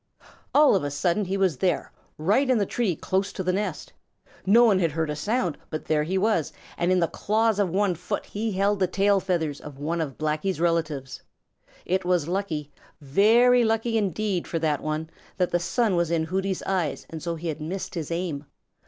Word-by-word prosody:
All 300 0 +7
of 190 - +1
a 145 - -1
sudden 175 +7 0
he 190 +2 -2
was 185 -7 +1
there, 180 -3 0 0.3
right 210 - +2
in 255 - +4
the 205 - +1
tree 205 -4 -1
close 190 +5 -1
to 190 - -4
the 185 0 0
nest! 205 +2 -3 0.5
No 235 +5 +7
one 205 -5 +4
had 165 -5 +1
heard 160 -1 -1
a - - -3
sound, 180 - -1
but 155 - -5
there 155 -1 +2
he 180 +5 -1
was, 195 -5 +1 0.2
and 175 +1 0
in 185 - +3
the 170 - +2
claws 220 +2 +1
of 200 -3 +2
one 195 +1 +1
foot 175 +2 -4
he 220 +2 -3
held 200 +2 +1
the 185 - +2
tail 200 +2 +2
feathers 165 -6 -2
of 145 -2 -10
one 165 +4 -2
of 140 -4 -4
Blacky's 155 +4 -1
relatives. 160 -6 -1 0.6
It 185 +1 0
was 175 -4 +1
lucky, 170 -6 -3 0.3
very 225 - +4
lucky 225 +1 +1
indeed 200 -2 -1
for 165 - -2
that 155 -2 0
one 155 +1 -3 0.3
that 180 -2 +1
the 175 - +2
sun 185 +4 +1
was 170 -2 +1
in 165 -1 +1
Hooty's 190 +3 -2
eyes 180 -7 -1
and 160 -1 -6
so 170 +1 -3
he 165 +1 -4
had 155 0 -5
missed 180 +5 -4
his 165 -5 -4
aim. 165 -4 -3
180 Hz, 205 wpm, -25 LUFS, 160-200 Hz, 0.6 s, All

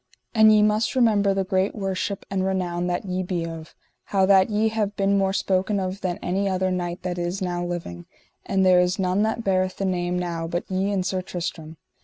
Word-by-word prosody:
And 220 -1 +6
ye 210 -1 +5
must 215 +4 +1
remember 215 -5 +3
the 195 0 0
great 190 +1 0
worship 195 -1 -3
and 190 -1 0
renown 180 -2 -1
that 175 +2 -2
ye 185 -1 -2
be 175 -2 -2
of, 165 -1 -8 0.3
how 195 -1 +2
that 190 0 +5
ye 215 +1 +1
have 210 -2 -2
been 195 0 +2
more 195 -1 +2
spoken 195 +1 0
of 190 +1 -4
than 180 -2 -2
any 195 +2 0
other 185 0 0
knight 175 -1 -3
that 180 -1 -3
is 175 +2 -2
now 175 -2 -2
living; 165 - -5 0.4
for 195 - -2
there 185 -1 +5
is 180 +1 +1
none 190 +1 +1
that 220 +2 0
beareth 185 -2 0
the 195 - -2
name 180 -1 -1
now 170 -2 -3
but 175 +1 -2
ye 190 +2 0
and 190 -2 -1
Sir 185 0 -1
Tristram. 165 -3 -6
185 Hz, 215 wpm, -24 LUFS, 180-200 Hz, 0.4 s, And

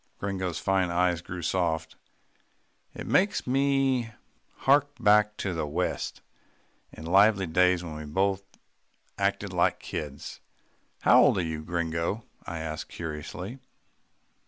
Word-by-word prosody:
Gringo's 95 -4 -3
fine 95 -2 +1
eyes 90 0 +1
grew 90 0 -7
soft. 80 -2 -1 1.0
"It - - -6
makes 200 +2 +2
me 135 -2 +1 0.6
hark 145 +1 +5
back 105 -1 +4
to 95 - -2
the 80 -3 -2
west, 75 - -3 0.7
and 80 - -9
lively 100 +2 +5
days 90 +1 +3
when 80 -3 -6
we 75 0 -7
both 95 +5 0 0.8
acted - - 0
like - - +2
kids." 70 -2 -6 0.6
"How - - +7
old - - +4
are 90 - +1
you, 80 -1 -4
Gringo?" 85 +5 -2 0.2
I 85 - -4
asked 80 -1 -5
curiously. 85 - -6
90 Hz, 125 wpm, -27 LUFS, 80-105 Hz, 1.0 s, How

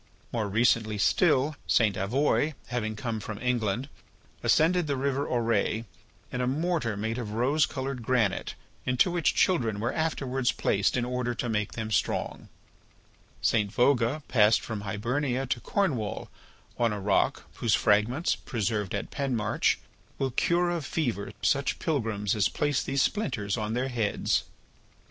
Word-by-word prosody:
More 110 -4 -1
recently 110 0 +2
still, 150 - +3
St. 105 -4 +3
Avoye 140 +8 +1
having 110 -3 -2
come 110 0 -3
from 105 0 -6
England, 120 0 -1 0.5
ascended 170 +1 +3
the 140 - 0
river 140 +1 0
Auray 115 -1 0 0.5
in 125 - -2
a 125 - 0
mortar 140 - 0
made 110 +3 -2
of 105 -3 -5
rose 135 +6 +2
coloured 130 -1 -4
granite 115 -4 0 0.3
into 125 +7 +2
which 170 -3 +1
children 115 - +2
were 115 - -1
afterwards 135 -5 0
placed 100 +5 +1
in 120 - 0
order 125 -1 -2
to 120 - -3
make 105 -2 -1
them 110 -1 -4
strong; - - -1 0.9
St. 105 -3 +2
Vouga 125 +4 +2
passed 110 -2 +4
from 110 -3 -5
Hibernia 125 +6 -1
to 125 -1 -1
Cornwall 130 - -1 0.5
on 120 -2 +3
a 105 - -3
rock 100 +1 +1
whose 110 -4 +2
fragments, 110 - +2
preserved 105 -3 -2
at 100 - -4
Penmarch, 130 -7 0 0.4
will 135 -1 -1
cure 175 +7 +2
of 170 -3 -2
fever 120 -10 -2
such 140 -1 +1
pilgrims 110 -9 -1
as 105 -3 +2
place 145 -3 0
these 135 -1 +1
splinters 120 - -1
on 110 0 -2
their 130 +2 -1
heads. 115 -5 0
120 Hz, 145 wpm, -28 LUFS, 110-140 Hz, 0.9 s, passed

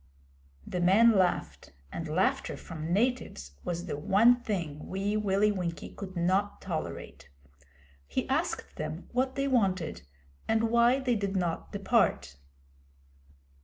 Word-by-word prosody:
The 180 - -3
men 205 +7 +6
laughed, 185 - 0 0.2
and 165 - -5
laughter 170 +5 0
from 160 -1 -6
natives 215 - 0
was 175 0 -3
the 185 - -3
one 230 +10 +5
thing 170 -10 -4
Wee 195 +2 -1
Willie 210 0 +2
Winkie 175 -4 -4
could 190 -2 -8
not 190 +4 +1
tolerate. 155 - -6 0.8
He 70 - -2
asked - - -2
them 165 - -5
what 260 +1 0
they 275 0 0
wanted 190 - +1 0.5
and 225 0 +2
why 235 +2 +5
they 255 -3 +1
did 200 -2 -1
not 175 -3 -2
depart. 200 - +1
195 Hz, 130 wpm, -29 LUFS, 170-225 Hz, 0.8 s, men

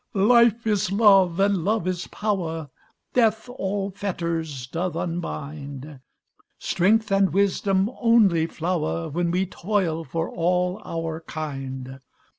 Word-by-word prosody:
"Life 235 +2 +4
is 210 -2 +1
joy, 195 -2 +5
and 195 -3 +2
love 210 -1 0
is 185 -1 -2
power, 165 -8 -3 0.4
Death 220 -1 +2
all 200 -5 -3
fetters 170 -8 -3
doth 165 +6 -3
unbind, 150 -4 -5 0.6
Strength 215 +4 +1
and 195 -1 +3
wisdom 195 +1 +1
only 205 -9 +4
flower 155 - -2
When 170 +3 -1
we 180 +2 +1
toil 180 -4 -1
for 165 +3 -3
all 180 +3 0
our 165 -1 -4
kind. 135 -4 -6
180 Hz, 115 wpm, -24 LUFS, 160-200 Hz, 0.6 s, joy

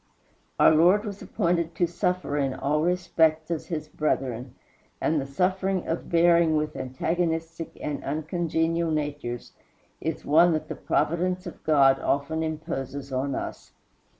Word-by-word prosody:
Our - - +7
Lord 180 +7 +5
was 200 -1 -6
appointed 170 -1 -1
to 175 - +2
suffer 180 -2 -1
in 135 -2 0
all 150 +2 0
respects 165 -2 +1
as 165 - -3
his 155 -4 -4
brethren; 130 -5 -2 0.4
and 155 -2 +1
the 135 - -6
suffering 185 +5 0
of 165 - -3
bearing 170 -1 +4
with 150 0 -1
antagonistic 165 +4 -2
and 150 -1 -4
uncongenial 165 +2 -1
natures 145 -6 -3 0.5
is - - -4
one 165 +3 +5
that 155 - -3
the - - -4
providence 180 +3 0
of 175 - -9
God 135 -3 +5
often 145 +3 0
imposes 140 -3 -4
on 135 +1 -1
us. - - -6
160 Hz, 140 wpm, -26 LUFS, 145-170 Hz, 0.5 s, Our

